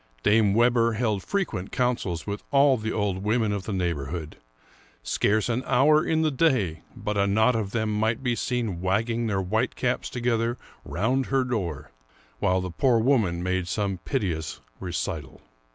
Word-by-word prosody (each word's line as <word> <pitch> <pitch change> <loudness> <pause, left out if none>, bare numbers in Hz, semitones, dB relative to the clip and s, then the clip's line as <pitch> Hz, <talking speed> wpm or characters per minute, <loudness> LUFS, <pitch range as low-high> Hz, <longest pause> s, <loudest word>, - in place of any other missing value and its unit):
Dame 105 -2 +4
Webber 115 0 +3
held 110 -3 0
frequent 175 - -2
councils 120 -10 -1
with 100 0 -4
all 140 -1 +5
the 110 -2 -3
old 100 -3 -1
women 110 0 +1
of 100 -2 -3
the - - -4
neighborhood; 85 -4 -3 0.7
scarce 105 - +1
an 120 +1 0
hour 150 +5 +4
in 160 0 +1
the 155 - +2
day 125 - +1
but 105 -1 -2
a 100 - +3
knot 110 +5 +3
of 110 -3 -1
them 110 0 -1
might 110 +3 0
be 125 -2 +1
seen 115 -6 -2
wagging 115 +5 0
their 95 -3 0
white 110 +7 0
caps 125 0 -1
together 120 -1 0 0.3
round 115 - 0
her 135 -1 +2
door, 100 - -3 0.5
while 95 0 +2
the 90 -1 -4
poor 125 +6 +3
woman 110 -8 +2
made 90 -1 -1
some 95 +1 -2
piteous 90 - -2 0.2
recital. 80 -6 -4
110 Hz, 165 wpm, -26 LUFS, 95-125 Hz, 0.7 s, all